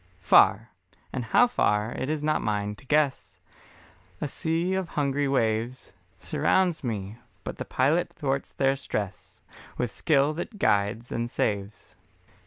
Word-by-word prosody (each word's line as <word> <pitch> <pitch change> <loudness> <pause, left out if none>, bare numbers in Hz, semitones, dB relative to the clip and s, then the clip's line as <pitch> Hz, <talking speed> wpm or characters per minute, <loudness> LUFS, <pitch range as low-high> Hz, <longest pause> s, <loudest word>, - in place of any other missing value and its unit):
Far, 110 +5 +5 0.4
and 125 -3 -3
how 245 - +5
far 110 - +1
it 130 - -4
is 155 -1 -2
not 155 0 +1
mine 105 -1 -1
to 135 - -18
guess, 145 -1 0 0.8
A - - -2
sea 165 +5 -1
of 190 -3 -2
hungry 140 -1 0
waves 120 -1 -1 0.2
Surrounds 180 -5 +1
me, 110 -2 -4 0.2
but - - -6
the - - -3
Pilot 150 +7 +1
thwarts 135 -2 -2
their 135 0 +1
stress 105 -7 -5 0.4
With 125 -3 -1
skill 145 -1 +2
that 175 +7 -6
guides 105 - +1
and 120 0 -2
saves. 100 -2 -3
135 Hz, 140 wpm, -27 LUFS, 110-155 Hz, 0.8 s, Far